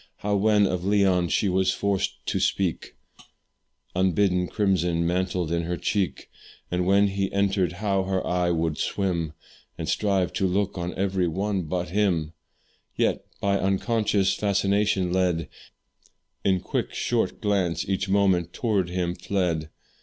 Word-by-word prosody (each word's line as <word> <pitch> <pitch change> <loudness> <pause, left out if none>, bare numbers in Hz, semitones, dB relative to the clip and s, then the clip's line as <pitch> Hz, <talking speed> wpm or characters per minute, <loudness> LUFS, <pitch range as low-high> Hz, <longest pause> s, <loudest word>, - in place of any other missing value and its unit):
How 105 0 -1
when 105 0 +4
of 90 -2 -1
Leon 95 -3 +2
she 100 - +1
was 95 0 +2
forced 100 -2 -2
to - - -1
speak, 95 -4 -1 1.0
Unbidden 90 0 +2
crimson 90 -5 +1
mantled 90 -1 -1
in 85 0 +1
her 90 +1 -2
cheek; 95 +2 -1 0.4
And 90 0 0
when 100 +1 +4
he 95 0 -2
entered, 95 -2 +1
how 95 0 0
her 95 -1 -1
eye 90 -1 +1
would 80 -2 0
swim, 85 -6 -1 0.4
And - - -4
strive 100 -4 +1
to 95 - +1
look 100 +2 0
on 90 -1 -4
every 95 -2 0
one 95 +2 -1
but 90 +1 -2
him; 85 -5 0 0.6
Yet, - - +1 0.2
by 100 0 +1
unconscious 100 0 +1
fascination 100 -2 +1
led, 90 -3 +1 0.9
In 95 -2 +2
quick - - -3
short - - 0
glance 95 -5 0
each 95 0 -1
moment 95 -4 +2
tow'rds 100 -7 0
him 90 -1 -1
fled. 90 -3 -1
95 Hz, 140 wpm, -25 LUFS, 90-100 Hz, 1.0 s, when